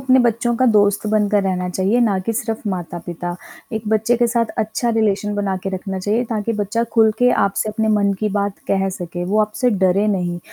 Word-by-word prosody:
अपने 260 -1 +4
बच्चों 235 0 +1
का 255 - +2
दोस्त 205 0 +3
बनकर 210 -1 +2
रहना 180 -1 -1
चाहिए 190 +6 +1
ना 210 -5 +2
कि 230 - -1
सिर्फ़ 225 -1 -3
माता-पिता। 175 -1 -5 0.4
एक 220 -1 -3
बच्चे 220 +2 +2
के 240 0 +2
साथ 235 0 +1
अच्छा 220 +3 -1
रिलेशन 210 -1 +1
बना 200 -2 -1
के - - -3
रखना 190 0 -4
चाहिए 210 +6 0
ताकि 220 0 -1
बच्चा 205 +3 0
खुल 220 -2 +5
के 245 0 +4
आपसे 200 +2 -1
अपने 220 +1 -1
मन 205 -2 +2
की 215 - +1
बात 200 -1 -1
कह 195 0 +1
सके। 175 -2 -5
वो 200 +4 0
आपसे 215 +4 +1
डरे 195 0 +2
नहीं, 180 -4 -1
210 Hz, 205 wpm, -19 LUFS, 190-225 Hz, 0.4 s, खुल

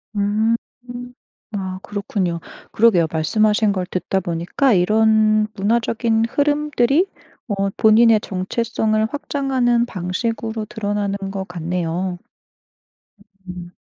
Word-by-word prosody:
음. 210 +3 +2 0.3
음. 245 0 -7 0.4
아 190 -3 -4
그렇군요. 195 -4 -2 0.3
그러게요. 210 -7 +4
말씀하신 210 +6 +2
걸 185 -2 -2
듣다 185 +1 -1
보니까 175 +9 0
이런 215 +2 +3
문화적인 225 +2 +1
흐름들이 295 +2 +2 0.4
어 195 -2 0
본인의 220 +2 +5
정체성을 215 +3 -1
확장하는 260 -5 0
방식으로 220 +4 -3
드러나는 205 -1 -2
것 195 -1 -4
같네요. 175 +1 -3 1.3
음. 175 -1 -8
215 Hz, 245 characters per minute, -20 LUFS, 185-230 Hz, 1.3 s, 본인의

